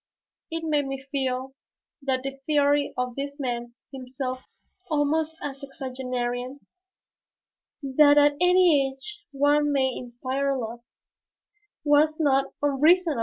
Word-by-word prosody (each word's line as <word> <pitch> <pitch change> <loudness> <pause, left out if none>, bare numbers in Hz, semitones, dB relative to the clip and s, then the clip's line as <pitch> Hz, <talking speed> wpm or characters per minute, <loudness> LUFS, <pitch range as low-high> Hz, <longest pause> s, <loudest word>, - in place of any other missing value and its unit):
It 330 -1 -4
made 295 -3 0
me 270 0 -4
feel 265 -1 -2 0.5
that 260 -2 -1
the 275 0 -5
theory 290 -1 +2
of 250 -1 -2
this 280 +1 -5
man, 240 -3 -4 0.2
himself 255 0 -5 0.5
almost 310 +1 0
a 285 - -3
sexagenarian, 255 -2 -4 1.3
that 290 +2 +5
at 290 0 +6
any 360 -6 +5
age 410 +11 -10
one 290 +1 +2
may 265 -2 +1
inspire 260 +3 -2
love, 235 -1 -5 1.0
was 300 +1 +3
not 275 -3 +2
unreasonable! 305 +1 +3
275 Hz, 115 wpm, -25 LUFS, 260-295 Hz, 1.3 s, at